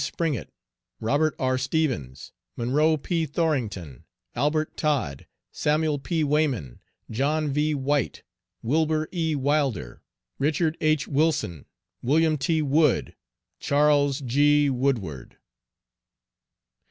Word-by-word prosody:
Springett, 160 -8 -2 0.5
Robert 145 +7 +1
R. 130 0 0
Stevens, 130 - -2 0.2
Monroe 150 +7 +2
P. 165 +2 -1
Thorington, 115 - -2 0.3
Albert 155 +2 0
Todd, 130 - -1 0.2
Samuel 150 -1 0
P. 160 +3 -1
Wayman, 140 - 0 0.3
John 145 +6 0
V. 150 +2 +1
White, 140 -1 -1 0.4
Wilber 155 +4 +1
E. 160 -4 -1
Wilder, 135 - -1 0.4
Richard 155 +2 +1
H. 155 -2 +2
Wilson, 145 - 0 0.3
William 155 +4 +3
T. 160 +3 +1
Wood, 150 0 +2 0.4
Charles 145 -1 +2
G. 145 +3 +3
Woodward. 115 - -2
145 Hz, 95 wpm, -25 LUFS, 130-155 Hz, 0.5 s, William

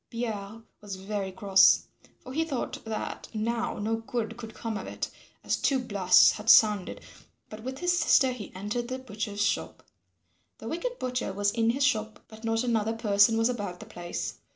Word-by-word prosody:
Pierre 225 -2 -5 0.2
was 205 -2 -6
very 195 0 -4
cross, 195 0 +5 0.4
for 255 - -9
he 320 +3 +1
thought 285 -6 -4
that 220 -1 -5
now 230 +2 -1
no 220 +2 -1
good 225 -1 -4
could 225 -2 -9
come 225 -1 -4
of - - -5
it, - - -5 0.3
as - - +1
two 275 - +2
blasts 205 -7 +5
had 210 +1 -4
sounded, 210 -5 +5 0.5
but 215 0 -8
with 260 +3 -5
his 355 +2 +1
sister 265 -2 +4
he 235 -6 -7
entered 210 +5 -3
the 255 +1 -3
butcher's 210 -4 -4
shop. 200 - -2 0.7
The 225 - -9
wicked 485 - -3
butcher 250 -4 -2
was 200 +1 0
in 230 0 +1
his 270 +4 +1
shop, 220 -6 0
but 220 +1 -13
not 225 +1 0
another 225 -2 0
person 220 -1 +3
was 225 0 +3
about 205 -8 -4
the - - -9
place. 175 0 -5
225 Hz, 180 wpm, -28 LUFS, 205-245 Hz, 0.7 s, cross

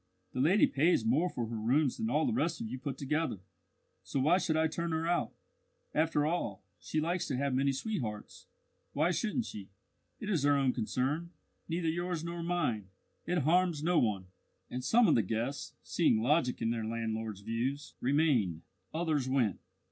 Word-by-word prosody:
"The 125 - -3
lady 175 +10 +5
pays 145 -4 +2
more 150 +11 +3
for 120 - -3
her 115 +1 -5
rooms 130 +6 +2
than 225 0 -1
all - - +2
the 250 - +1
rest 170 -8 0
of - - -4
you 125 +3 -5
put 135 -1 -4
together, 150 -2 -1 0.6
so 140 - -3
why 160 +8 +4
should 160 -4 0
I 160 - +3
turn 170 +1 -2
her 160 +1 0
out? 175 - +1 0.6
After 155 -2 +2
all, 170 +3 -2 0.2
if - - -23
she 155 - 0
likes 170 +3 -1
to 130 - -1
have 140 0 0
many 135 +2 +2
sweethearts, 135 - -4 0.5
why - - +2
shouldn't 225 +2 -1
she? 100 -2 -8 0.5
It 215 - -6
is 185 -8 +1
her 145 0 +4
own 135 -2 +2
concern, 135 +8 -1 0.4
neither 165 0 -1
yours 175 0 -1
nor 170 0 -4
mine. 165 - -1 0.4
It 175 -4 +1
harms 170 0 +2
no 175 0 +3
one!" 100 -5 0 0.5
And 125 0 -4
some 230 - +5
of - - +5
the 115 - +4
guests, 115 +7 -3
seeing 110 - +2
logic 130 -3 +2
in 115 - +1
their 115 -1 -2
landlord's 110 -2 -3
views, 120 +7 -3
remained; 125 - +2 0.3
others 155 -6 0
went. 130 -6 +1
145 Hz, 185 wpm, -32 LUFS, 120-170 Hz, 0.6 s, lady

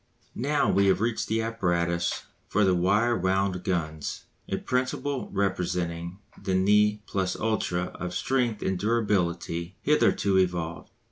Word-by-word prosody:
Now 145 +4 +1
we 100 0 +3
have 95 - +3
reached 110 -1 -1
the 110 +1 0
apparatus 85 -6 0 0.2
for 105 - +2
the 95 - +4
wire 100 +7 +3
wound 95 -1 0
guns, 80 -5 -3 0.2
a - - 0
principle 130 +2 -2
representing 90 -3 -1 0.2
the 95 -2 0
ne 105 +2 +3
plus 95 -2 -1
ultra 110 -5 0
of 90 0 -5
strength 120 +1 0
and 95 -1 -1
durability 95 -5 0
hitherto 95 -2 +3
evolved. 85 -2 -1
95 Hz, 130 wpm, -27 LUFS, 90-110 Hz, 0.2 s, the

